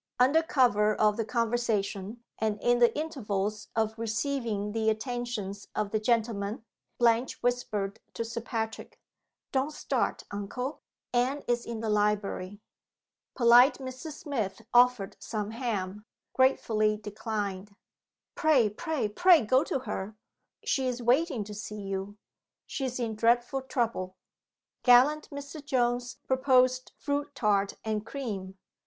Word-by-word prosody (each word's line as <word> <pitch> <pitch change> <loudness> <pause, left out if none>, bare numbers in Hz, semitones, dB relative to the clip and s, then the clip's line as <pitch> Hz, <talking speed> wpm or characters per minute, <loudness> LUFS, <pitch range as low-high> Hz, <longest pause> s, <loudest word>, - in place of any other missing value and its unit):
Under 270 +6 +5
cover 225 -9 +3
of 210 -1 +3
the 225 0 -2
conversation, 225 -2 -1 0.2
and 215 -1 0
in 240 +3 +2
the 240 -1 +6
intervals 215 -9 -2
of 220 0 0
receiving 225 -2 -2
the 220 0 +1
attentions 220 -3 -3
of 205 -1 -1
the 215 - +1
gentlemen, 220 -1 0 0.3
Blanche 235 +1 +2
whispered 215 -5 -1 0.2
to 230 - -2
Sir 235 +1 -4
Patrick, 225 -1 -5 0.5
"Don't 270 +3 0
start, - - -1
uncle. 250 +8 -4 0.3
Anne 255 +4 +1
is 240 -1 0
in 230 -2 -4
the 225 - -2
library." 205 -2 0 0.8
(Polite 245 +3 +6
Mr. 260 +4 -7
Smith 230 - -4
offered 245 -5 +4
some 215 -1 -4
ham. 210 -4 -3 0.3
Gratefully 215 -5 +2
declined.) 205 -2 -4 0.6
"Pray, 275 -10 +3
pray, 280 +1 -2
pray 330 - +5
go 260 +6 +4
to 265 - -2
her; 210 -4 -5 0.5
she 265 -1 0
is 250 -1 -3
waiting 255 0 +2
to 210 +1 -9
see 210 0 -6
you 195 +1 -4 0.5
she 270 - -3
is 255 -1 -3
in 230 -2 -1
dreadful 240 +4 +2
trouble." 230 -8 -2 0.7
(Gallant 270 +5 +5
Mr. 285 +1 -8
Jones 245 -2 0
proposed 255 -1 +3
fruit 285 0 -2
tart 200 -4 +1
and 215 -1 -1
cream. 205 -7 -5
230 Hz, 130 wpm, -29 LUFS, 210-255 Hz, 0.8 s, the